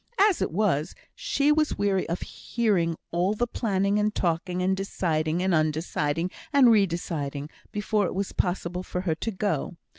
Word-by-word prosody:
As 405 Hz, -2 st, +4 dB
it -, -, +1 dB
was, 170 Hz, -4 st, 0 dB, 0.2 s
she 285 Hz, +1 st, +1 dB
was 305 Hz, 0 st, +2 dB
weary 200 Hz, -3 st, +1 dB
of 170 Hz, -, -2 dB
hearing 195 Hz, -8 st, 0 dB, 0.2 s
all 180 Hz, +5 st, +1 dB
the 240 Hz, -, +1 dB
planning 200 Hz, -3 st, 0 dB
and 210 Hz, 0 st, 0 dB
talking, 180 Hz, +1 st, 0 dB
and 190 Hz, +1 st, +2 dB
deciding 170 Hz, -3 st, -1 dB
and 190 Hz, -1 st, +2 dB
un 155 Hz, -1 st, +3 dB
deciding, 160 Hz, +2 st, -1 dB, 0.2 s
and 275 Hz, -5 st, +6 dB
re 205 Hz, -3 st, +5 dB
deciding, 150 Hz, -4 st, -4 dB, 0.2 s
before 210 Hz, -1 st, 0 dB
it -, -, -5 dB
was 195 Hz, 0 st, -2 dB
possible 180 Hz, -1 st, -1 dB
for 180 Hz, -1 st, -4 dB
her 175 Hz, -4 st, 0 dB
to 165 Hz, -, -3 dB
go. 200 Hz, -3 st, -2 dB
185 Hz, 175 wpm, -26 LUFS, 165-210 Hz, 0.2 s, and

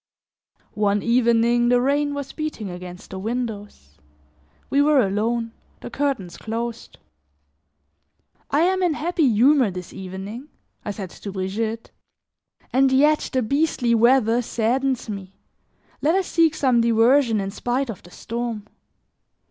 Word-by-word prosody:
One 205 Hz, -1 st, +1 dB
evening 235 Hz, 0 st, +3 dB
the 245 Hz, 0 st, +4 dB
rain 285 Hz, +3 st, +1 dB
was 280 Hz, -1 st, -5 dB
beating 300 Hz, -, -5 dB
against 180 Hz, 0 st, -10 dB
the 190 Hz, -, -6 dB
windows; 205 Hz, -, -5 dB, 0.7 s
we 280 Hz, -, +2 dB
were 295 Hz, -1 st, +4 dB
alone, 225 Hz, +4 st, -1 dB, 0.3 s
the -, -, -8 dB
curtains 260 Hz, -12 st, -2 dB
closed. 230 Hz, +1 st, -5 dB, 1.5 s
"I 290 Hz, -, +2 dB
am 375 Hz, +2 st, +2 dB
in 350 Hz, -4 st, +1 dB
happy 325 Hz, -3 st, +1 dB
humor 250 Hz, +2 st, +4 dB
this 180 Hz, -1 st, -8 dB
evening," 195 Hz, +8 st, -8 dB, 0.3 s
I -, -, -5 dB
said 195 Hz, -3 st, -6 dB
to 200 Hz, -, -8 dB
Brigitte, 215 Hz, +4 st, -3 dB, 0.8 s
"and 265 Hz, +1 st, +4 dB
yet 295 Hz, +3 st, +3 dB
the 260 Hz, -2 st, 0 dB
beastly 275 Hz, -1 st, +1 dB
weather 235 Hz, 0 st, +4 dB
saddens 245 Hz, +3 st, -1 dB
me. 195 Hz, -3 st, -7 dB, 0.7 s
Let 315 Hz, +4 st, +2 dB
us 385 Hz, -1 st, +1 dB
seek 330 Hz, -3 st, +2 dB
some 255 Hz, -6 st, +2 dB
diversion 230 Hz, +1 st, +3 dB
in 195 Hz, 0 st, -3 dB
spite 245 Hz, +4 st, -2 dB
of 200 Hz, -, -11 dB
the 175 Hz, -, -16 dB
storm." 230 Hz, +1 st, -5 dB
235 Hz, 130 wpm, -22 LUFS, 210-275 Hz, 1.5 s, the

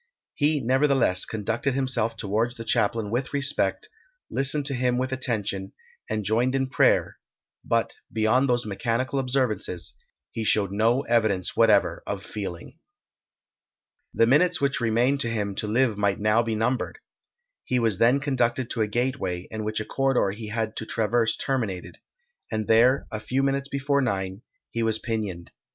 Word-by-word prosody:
He, 150 Hz, 0 st, +1 dB
nevertheless, 130 Hz, -6 st, +3 dB
conducted 115 Hz, +5 st, -2 dB
himself 120 Hz, -4 st, 0 dB
towards 110 Hz, +4 st, -1 dB
the 115 Hz, -, -6 dB
chaplain 105 Hz, -1 st, 0 dB
with 125 Hz, +3 st, -1 dB
respect, 140 Hz, -, 0 dB, 0.4 s
listened 140 Hz, +1 st, 0 dB
to 140 Hz, -, 0 dB
him 125 Hz, -1 st, +1 dB
with 130 Hz, +1 st, -1 dB
attention, 105 Hz, -7 st, -2 dB, 0.4 s
and 110 Hz, -1 st, -2 dB
joined 120 Hz, +5 st, +1 dB
in 135 Hz, -1 st, -1 dB
prayer; -, -, +2 dB, 0.4 s
but, -, -, 0 dB, 0.2 s
beyond 115 Hz, +5 st, +2 dB
those 120 Hz, -1 st, +1 dB
mechanical 115 Hz, +6 st, -1 dB
observances, 125 Hz, -9 st, -1 dB, 0.4 s
he 115 Hz, -, -4 dB
showed 100 Hz, -2 st, +1 dB
no 115 Hz, +6 st, +2 dB
evidence 110 Hz, -7 st, +1 dB
whatever -, -, +3 dB
of -, -, -4 dB
feeling. 95 Hz, -, -7 dB, 1.3 s
The 115 Hz, -, +3 dB
minutes 160 Hz, +7 st, +3 dB
which 140 Hz, -3 st, 0 dB
remained 120 Hz, +5 st, +2 dB
to 120 Hz, -, 0 dB
him 105 Hz, -3 st, -2 dB
to 105 Hz, -, -2 dB
live 115 Hz, -1 st, +1 dB
might 100 Hz, -1 st, +1 dB
now 105 Hz, +2 st, +3 dB
be 115 Hz, -1 st, -2 dB
numbered. 125 Hz, -, -1 dB, 0.7 s
He 125 Hz, -, 0 dB
was 115 Hz, -5 st, +1 dB
then 125 Hz, +4 st, +4 dB
conducted 130 Hz, -3 st, 0 dB
to 115 Hz, -, -1 dB
a 110 Hz, -, +2 dB
gateway; 105 Hz, -6 st, -2 dB
in 110 Hz, -1 st, -4 dB
which 110 Hz, +1 st, -2 dB
a 110 Hz, -, -4 dB
corridor 135 Hz, -7 st, +1 dB
he 110 Hz, +2 st, -7 dB
had 110 Hz, 0 st, -3 dB
to 110 Hz, -, -4 dB
traverse 115 Hz, 0 st, +1 dB
terminated, 115 Hz, -9 st, -3 dB, 0.5 s
and 110 Hz, -1 st, -1 dB
there, 120 Hz, +5 st, +4 dB
a 110 Hz, -, -3 dB
few 130 Hz, +5 st, -1 dB
minutes 140 Hz, 0 st, 0 dB
before 140 Hz, 0 st, 0 dB
nine, 95 Hz, -4 st, -2 dB, 0.3 s
he 115 Hz, -, -2 dB
was 110 Hz, -1 st, +1 dB
pinioned. 105 Hz, -7 st, -4 dB
115 Hz, 160 wpm, -25 LUFS, 110-130 Hz, 1.3 s, then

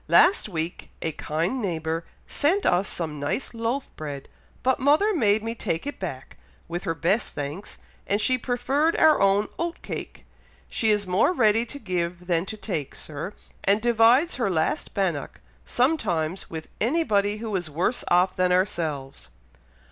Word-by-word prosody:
Last 370 Hz, -, +5 dB
week 165 Hz, -2 st, -4 dB
a 160 Hz, -, 0 dB
kind 165 Hz, -, -2 dB
neighbour 165 Hz, -3 st, -2 dB, 0.2 s
sent 365 Hz, +7 st, +1 dB
us 180 Hz, +3 st, +3 dB
some 155 Hz, -4 st, -4 dB
nice 145 Hz, -, -2 dB
loaf 230 Hz, +4 st, -2 dB
bread, 145 Hz, -3 st, -6 dB, 0.3 s
but 260 Hz, +2 st, +2 dB
mother 300 Hz, +11 st, +4 dB
made 215 Hz, -, +3 dB
me 225 Hz, 0 st, -2 dB
take 165 Hz, -5 st, -3 dB
it 285 Hz, -, -5 dB
back, 140 Hz, -9 st, -6 dB, 0.3 s
with 175 Hz, +1 st, -4 dB
her 165 Hz, -, -1 dB
best 190 Hz, +7 st, +1 dB
thanks, 145 Hz, +7 st, -5 dB, 0.3 s
and 205 Hz, -, +1 dB
she 255 Hz, +4 st, +3 dB
preferred 270 Hz, +6 st, +1 dB
our 315 Hz, -1 st, +5 dB
own 195 Hz, +1 st, +4 dB
oat 340 Hz, 0 st, -2 dB
cake. -, -, -7 dB, 0.4 s
She 225 Hz, -, +1 dB
is 210 Hz, -1 st, +2 dB
more 185 Hz, -, +3 dB
ready 225 Hz, -, +3 dB
to 285 Hz, -, -7 dB
give 180 Hz, -6 st, -3 dB
than 175 Hz, 0 st, 0 dB
to 215 Hz, -, -5 dB
take, 175 Hz, -10 st, -4 dB
Sir, 155 Hz, +6 st, -6 dB, 0.3 s
and 200 Hz, +2 st, +4 dB
divides 240 Hz, +8 st, +4 dB
her 240 Hz, -6 st, +1 dB
last 160 Hz, -4 st, -1 dB
bannock, 175 Hz, -8 st, -1 dB, 0.3 s
sometimes, 190 Hz, -, 0 dB
with 160 Hz, -1 st, -6 dB
anybody 215 Hz, -7 st, +2 dB
who 215 Hz, -2 st, -4 dB
is 175 Hz, -4 st, -2 dB
worse 175 Hz, -, 0 dB
off 180 Hz, +2 st, +3 dB
than 180 Hz, 0 st, +2 dB
ourselves." 160 Hz, -7 st, -1 dB
200 Hz, 160 wpm, -25 LUFS, 165-240 Hz, 0.4 s, Last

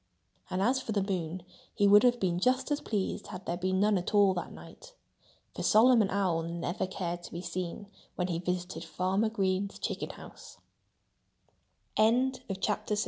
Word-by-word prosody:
And 185 Hz, +1 st, -1 dB
as 260 Hz, +4 st, +2 dB
for 220 Hz, -, -4 dB
the 200 Hz, -2 st, +1 dB
moon, 180 Hz, -3 st, -3 dB, 0.3 s
he 205 Hz, -, +3 dB
would 205 Hz, +1 st, +8 dB
have 245 Hz, -1 st, +3 dB
been 175 Hz, -3 st, 0 dB
just 255 Hz, +8 st, +1 dB
as 290 Hz, -, 0 dB
pleased 205 Hz, -3 st, -2 dB
had 185 Hz, -1 st, -8 dB
there 170 Hz, -, -1 dB
been 185 Hz, +1 st, 0 dB
none 205 Hz, -1 st, +3 dB
at 180 Hz, -, -3 dB
all 200 Hz, -2 st, +5 dB
that 175 Hz, -, -5 dB
night. -, -, -13 dB, 0.6 s
For -, -, -4 dB
Solomon 225 Hz, -2 st, +5 dB
Owl 185 Hz, -4 st, +1 dB
never 170 Hz, +3 st, -3 dB
cared 175 Hz, -2 st, -4 dB
to -, -, -10 dB
be 170 Hz, +1 st, -6 dB
seen 175 Hz, +3 st, -4 dB, 0.3 s
when 180 Hz, -, -1 dB
he 170 Hz, -2 st, -2 dB
visited 180 Hz, -1 st, -3 dB
Farmer 185 Hz, +6 st, 0 dB
Green 195 Hz, -2 st, 0 dB
190 Hz, 150 wpm, -30 LUFS, 175-210 Hz, 0.6 s, would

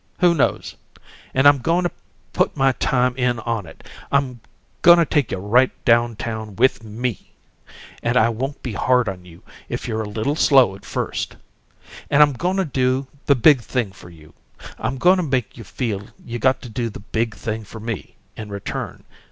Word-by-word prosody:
Who 175 Hz, -2 st, +4 dB
knows? 145 Hz, -, -1 dB, 0.5 s
And 135 Hz, +2 st, +4 dB
I'm 145 Hz, -1 st, +6 dB
goin' 170 Hz, +7 st, +1 dB
to 175 Hz, -, 0 dB, 0.4 s
put -, -, 0 dB
my 135 Hz, 0 st, +4 dB
time 125 Hz, 0 st, +1 dB
in 125 Hz, -2 st, +1 dB
on 115 Hz, -5 st, -3 dB
it. -, -, -14 dB, 0.3 s
I'm 130 Hz, -4 st, 0 dB, 0.4 s
goin' 175 Hz, 0 st, +8 dB
to 170 Hz, -, +4 dB
take 145 Hz, -5 st, 0 dB
you -, -, -2 dB
right 115 Hz, +7 st, +3 dB, 0.2 s
down 120 Hz, -1 st, +3 dB
town 110 Hz, -2 st, -5 dB
with 125 Hz, +2 st, +2 dB
ME, 115 Hz, +2 st, -5 dB, 0.7 s
and 120 Hz, +2 st, +1 dB
I 115 Hz, -2 st, +4 dB
won't 130 Hz, +5 st, -4 dB
be 125 Hz, -, -4 dB
hard 125 Hz, +3 st, +2 dB
on 90 Hz, -2 st, -5 dB
you 85 Hz, +3 st, -15 dB, 0.3 s
if 120 Hz, -, -4 dB
you're 110 Hz, -1 st, -2 dB
a 105 Hz, -, -5 dB
little 110 Hz, +7 st, -1 dB
slow 135 Hz, -10 st, +5 dB
at 100 Hz, -, -15 dB
first. -, -, -3 dB, 0.7 s
And 145 Hz, +1 st, +7 dB
I'm 145 Hz, -1 st, +2 dB
goin' 180 Hz, +10 st, -1 dB
to 190 Hz, -, +1 dB
do 130 Hz, -1 st, 0 dB, 0.2 s
the 140 Hz, -, +5 dB
big 135 Hz, +1 st, +5 dB
thing 115 Hz, -3 st, -2 dB
for 90 Hz, -2 st, -14 dB
you. 80 Hz, -3 st, -16 dB, 0.5 s
I'm 125 Hz, +4 st, -2 dB
goin' 180 Hz, +7 st, +5 dB
to 180 Hz, -, 0 dB
make 130 Hz, -7 st, -1 dB
you 115 Hz, -, -10 dB
feel 105 Hz, -1 st, -4 dB, 0.2 s
you 120 Hz, -1 st, -5 dB
got 130 Hz, +4 st, +2 dB
to 125 Hz, -, -8 dB
do 115 Hz, +1 st, -3 dB
the 105 Hz, -, -9 dB
big 110 Hz, +1 st, -2 dB
thing 110 Hz, +1 st, -4 dB
for 110 Hz, +2 st, -10 dB
me, 110 Hz, -2 st, -6 dB, 0.2 s
in 110 Hz, -1 st, -8 dB
return. 100 Hz, -1 st, -6 dB
120 Hz, 195 wpm, -21 LUFS, 110-135 Hz, 0.7 s, goin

